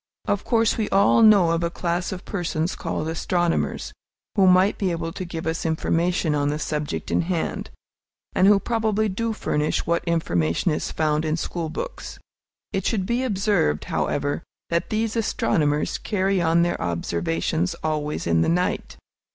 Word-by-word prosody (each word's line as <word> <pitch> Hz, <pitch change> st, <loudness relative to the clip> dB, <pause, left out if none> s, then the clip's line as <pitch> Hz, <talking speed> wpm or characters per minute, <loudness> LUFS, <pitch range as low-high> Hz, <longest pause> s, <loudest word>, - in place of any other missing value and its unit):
Of 205 Hz, -, 0 dB
course, 230 Hz, -2 st, +2 dB
we 215 Hz, -, 0 dB
all 200 Hz, +3 st, +4 dB
know 205 Hz, -6 st, +6 dB
of 165 Hz, 0 st, 0 dB
a 170 Hz, -, +1 dB
class 175 Hz, +1 st, -2 dB
of 185 Hz, -2 st, -7 dB
persons 175 Hz, -3 st, -2 dB
called 155 Hz, -, -3 dB
astronomers, 170 Hz, +1 st, -1 dB, 0.4 s
who 195 Hz, -3 st, +5 dB
might 185 Hz, +2 st, +4 dB
be 195 Hz, -, +1 dB
able 165 Hz, -1 st, -3 dB
to 185 Hz, -, -5 dB
give 170 Hz, -2 st, -6 dB
us 160 Hz, 0 st, -2 dB
information 165 Hz, 0 st, 0 dB
on 145 Hz, -1 st, +1 dB
the 150 Hz, -, -1 dB
subject 150 Hz, -1 st, -3 dB
in -, -, +3 dB
hand, 170 Hz, -1 st, -2 dB, 0.6 s
and 190 Hz, -, +4 dB
who 205 Hz, -1 st, +6 dB
probably 220 Hz, -1 st, 0 dB
do 230 Hz, +4 st, -2 dB
furnish 150 Hz, -8 st, -1 dB
what 170 Hz, +1 st, 0 dB
information 125 Hz, -, +1 dB
is 150 Hz, -, -2 dB
found 155 Hz, -1 st, 0 dB
in 155 Hz, 0 st, 0 dB
school 165 Hz, -1 st, -3 dB
books. -, -, -6 dB, 0.6 s
It 195 Hz, -, -1 dB
should 200 Hz, -5 st, 0 dB
be 235 Hz, +5 st, 0 dB
observed, 200 Hz, -, +1 dB
however, 145 Hz, +2 st, -1 dB, 0.3 s
that 170 Hz, 0 st, 0 dB
these 220 Hz, +1 st, -1 dB
astronomers 150 Hz, -9 st, 0 dB
carry 195 Hz, -2 st, 0 dB
on 170 Hz, 0 st, +3 dB
their 175 Hz, -, -1 dB
observations 85 Hz, -, -1 dB
always 150 Hz, -1 st, -2 dB
in 85 Hz, -1 st, +2 dB
the -, -, +2 dB
night. 180 Hz, +2 st, -1 dB
170 Hz, 165 wpm, -23 LUFS, 155-195 Hz, 0.6 s, know